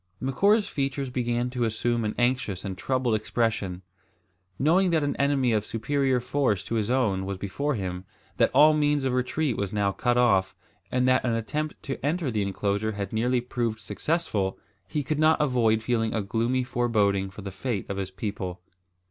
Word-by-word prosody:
Macora's 200 - +2
features 135 -1 -2
began 120 0 -1
to 125 -2 -1
assume 115 +1 0
an 105 - -2
anxious 120 -6 0
and 95 -2 -3
troubled 130 +3 0
expression. 110 -4 -1 0.7
Knowing 180 +7 +3
that 160 -3 +2
an 145 -1 -1
enemy 140 -3 +2
of 105 -2 +1
superior 130 +4 0
force 125 -5 0
to - - -6
his 110 -1 0
own 110 -7 +1
was 95 0 -4
before 140 +10 -2
him, 90 -2 -4 0.3
that - - +4
all 155 +1 +7
means 145 -2 +2
of 130 - +1
retreat 130 +1 0
was 100 -1 -2
now 100 -1 +1
cut 120 +4 0
off, 95 -6 +3 0.4
and 125 0 +2
that 130 0 +3
an 120 -2 +1
attempt 150 +7 -3
to 135 - -5
enter 150 -1 0
the 110 -2 0
enclosure 100 +2 -1
had 100 -1 -5
nearly 120 +3 +1
proved 120 -2 -2
successful, 105 - -2 0.3
he 145 +8 -2
could 150 +2 -2
not 155 +1 +4
avoid 115 -6 +2
feeling 115 -1 0
a 110 - 0
gloomy 120 +5 0
foreboding 105 -6 +1
for 100 +1 -10
the 100 - -5
fate 105 0 -3
of 100 - -4
his 95 -1 -3
people. 95 -2 -5
120 Hz, 180 wpm, -26 LUFS, 100-135 Hz, 0.7 s, all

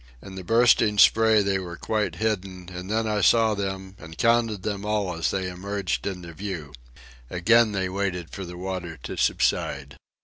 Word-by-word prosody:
In 95 - -11
the 95 -1 -7
bursting 115 0 +4
spray 110 0 +5
they 100 -1 0
were 85 -2 -7
quite 105 -5 -1
hidden; 95 -3 -3
and 90 +2 -7
then 110 +1 0
I 105 -1 0
saw 115 -1 +4
them 95 -1 -4
and 80 +1 -11
counted 115 -4 +2
them 100 -2 -3
all 105 -3 -1
as 85 -1 -1
they 95 -1 -2
emerged 90 -6 -3
into 90 -4 -6
view. 85 -6 -6 0.6
Again 115 +5 +4
they 95 -2 -1
waited 90 -3 -3
for 95 - -6
the 90 -1 -8
water 90 -3 -5
to - - -5
subside. - - 0
95 Hz, 175 wpm, -25 LUFS, 90-105 Hz, 0.6 s, spray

